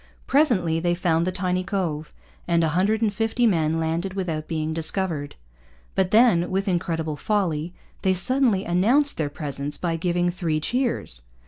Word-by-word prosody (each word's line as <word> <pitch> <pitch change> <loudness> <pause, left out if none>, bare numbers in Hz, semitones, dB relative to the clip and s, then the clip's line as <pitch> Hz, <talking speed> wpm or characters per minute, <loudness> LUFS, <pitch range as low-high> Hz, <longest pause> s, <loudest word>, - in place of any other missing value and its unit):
Presently 200 - +2
they 175 +1 +1
found 170 -1 +1
the - - +1
tiny 185 0 -1
cove, 175 -6 -3 0.4
and 170 -1 +2
a 160 - +2
hundred 200 +7 +1
and 210 -2 +1
fifty 225 +3 0
men 165 -6 +2
landed 165 +4 -2
without 165 -5 -3
being 160 -1 -2
discovered. 160 -2 -1 0.6
But 190 -1 +1
then, 215 -6 +4
with 195 +2 -1
incredible 165 -4 -1
folly, 175 -4 -1 0.3
they 190 -1 +2
suddenly 235 -1 +2
announced 235 +12 +2
their 155 -3 -1
presence 145 -1 -4
by 170 -2 -1
giving 175 +1 0
three 170 -4 -1
cheers. 235 - -1
175 Hz, 155 wpm, -24 LUFS, 160-195 Hz, 0.6 s, then